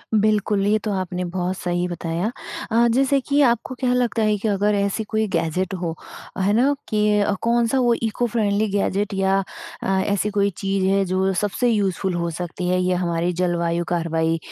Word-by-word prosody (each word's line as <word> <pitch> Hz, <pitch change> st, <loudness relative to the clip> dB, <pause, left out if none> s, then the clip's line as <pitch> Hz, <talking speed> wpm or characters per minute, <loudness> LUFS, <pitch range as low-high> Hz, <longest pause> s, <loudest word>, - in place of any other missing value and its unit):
बिल्कुल, 210 Hz, -1 st, +2 dB
ये 215 Hz, +1 st, +3 dB
तो 215 Hz, -, -2 dB
आपने 180 Hz, 0 st, -3 dB
बहुत 180 Hz, +1 st, -2 dB
सही 175 Hz, 0 st, -1 dB
बताया। 175 Hz, +4 st, -3 dB, 0.4 s
अ, 235 Hz, +1 st, +4 dB
जैसे 275 Hz, +2 st, +3 dB
कि 285 Hz, +2 st, +1 dB
आपको 235 Hz, +2 st, -2 dB
क्या 255 Hz, -2 st, +1 dB
लगता 245 Hz, -2 st, +1 dB
है 215 Hz, -1 st, +2 dB
कि 210 Hz, -, -3 dB
अगर 205 Hz, 0 st, +1 dB
ऐसी 200 Hz, +2 st, 0 dB
कोई 220 Hz, +1 st, -1 dB
गैज़ेट 165 Hz, +3 st, -1 dB
हो, 165 Hz, -2 st, -2 dB, 0.4 s
है 195 Hz, +2 st, +1 dB
ना? 260 Hz, +6 st, +3 dB, 0.2 s
कि 210 Hz, -1 st, +2 dB
अ, 205 Hz, 0 st, +1 dB
कौन-सा 235 Hz, +2 st, +2 dB
वो 240 Hz, -2 st, +3 dB
इको 225 Hz, +2 st, 0 dB
फ़्रेंडली 215 Hz, -2 st, +1 dB
गैज़ेट 200 Hz, +1 st, 0 dB
या 195 Hz, 0 st, +2 dB, 0.5 s
अ, -, -, -2 dB, 0.2 s
ऐसी 205 Hz, +1 st, 0 dB
कोई 200 Hz, -1 st, +1 dB
चीज़ 195 Hz, -1 st, -1 dB
है 195 Hz, +1 st, +3 dB
जो 190 Hz, +1 st, +1 dB
सबसे 205 Hz, +6 st, 0 dB
यूज़फुल 195 Hz, -4 st, 0 dB
हो 170 Hz, 0 st, -1 dB
सकती 180 Hz, 0 st, -4 dB
है 180 Hz, 0 st, +2 dB
या 180 Hz, 0 st, +1 dB
हमारे 170 Hz, 0 st, 0 dB
जलवायु 170 Hz, -1 st, 0 dB
कार्यवाही 165 Hz, -1 st, 0 dB
200 Hz, 185 wpm, -22 LUFS, 180-215 Hz, 0.5 s, अ